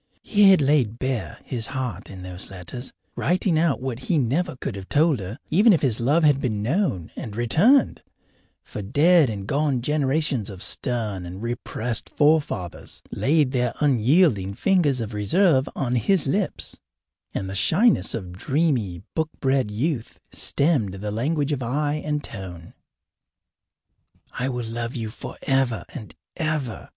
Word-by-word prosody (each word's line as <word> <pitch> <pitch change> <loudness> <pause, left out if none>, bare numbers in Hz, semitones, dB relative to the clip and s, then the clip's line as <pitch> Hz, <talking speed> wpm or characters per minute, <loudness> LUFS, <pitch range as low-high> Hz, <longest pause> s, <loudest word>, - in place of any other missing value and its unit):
He 205 -2 +5
had 190 -4 +6
laid 135 -6 +2
bare 130 -4 -3
his 115 -4 -4
heart 115 -7 -4
in 95 -2 -9
those 90 0 -7
letters, 95 +7 -7 0.2
writing 175 -2 +1
out 165 -5 +2
what 130 -3 -3
he 170 - +3
never 150 +6 0
could 125 - -5
have 95 -1 -9
told 150 -3 +3
her, 100 +4 -6
even 205 +7 +6
if 165 - +1
his 120 -6 +1
love 145 +8 +2
had 145 -3 +4
been 105 -5 -1
known 125 - -1
and 105 -3 -7
returned, 175 - +3 0.6
for - - -7
dead 145 - +4
and 100 -3 -5
gone 140 +2 0
generations 145 -4 0
of 95 -2 -3
stern 110 -7 -1
and 90 +4 -8
repressed 120 -1 -3
forefathers 145 - 0
laid 145 -2 +2
their 125 -2 0
unyielding 125 - +3
fingers 150 - +2
of 110 0 -5
reserve 135 - +2
on 125 -2 -1
his 160 - +2
lips, 190 +7 -1 0.6
and 95 - -2
the 95 - -5
shyness 195 - +3
of 95 -6 -6
dreamy, 125 - 0
book 160 -1 -1
bred 135 -4 +1
youth 120 +3 -3
stemmed 135 - +1
the 105 +2 -5
language 145 +6 -1
of 140 -3 -1
eye 145 +5 -1
and 150 -1 -2
tone. 90 -5 -8 1.6
I 125 +2 -2
will 125 -2 -3
love 115 +2 -4
you 115 -3 -3
forever 135 -1 -2
and 110 - -9 0.2
ever. 155 -7 -3
130 Hz, 150 wpm, -24 LUFS, 110-155 Hz, 1.6 s, had